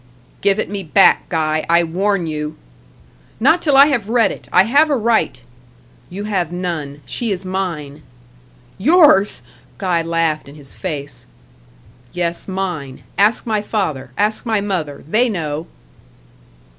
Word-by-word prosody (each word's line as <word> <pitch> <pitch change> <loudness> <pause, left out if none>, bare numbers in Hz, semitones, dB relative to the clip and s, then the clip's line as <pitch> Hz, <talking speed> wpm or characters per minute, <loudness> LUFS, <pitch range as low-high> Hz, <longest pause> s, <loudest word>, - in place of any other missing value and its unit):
"Give 200 0 +3
it - - -1
me 200 0 -4
back, 190 +3 +4
Guy; 155 -2 0
I 170 +1 +5
warn 185 +2 0
you." 150 -1 -4 0.8
"Not 320 +9 +4
till 290 -4 +3
I 275 - +9
have 245 -8 -1
read 230 -1 +3
it. - - -10
I 180 - +6
have 285 +9 +3
a 290 - +2
right." 225 - +1 0.7
"You 195 +3 -6
have 190 -6 -1
none. 165 -5 -4
She 230 - -3
is 190 -1 -3
mine." 170 -6 -4 0.8
"Yours?" 260 - +4 0.3
Guy 180 -4 0
laughed 165 -2 -1
in 140 - -13
his 140 -3 -10
face. 140 -8 -6 0.9
"Yes, 170 -1 -3
mine. 180 -9 -4
Ask 210 +3 +2
my 215 -3 0
father 160 - -3
ask 210 +1 0
my 225 -3 0
mother. 175 -8 -3
They 235 +8 +2
know." 160 -5 -3
185 Hz, 145 wpm, -18 LUFS, 155-210 Hz, 0.9 s, I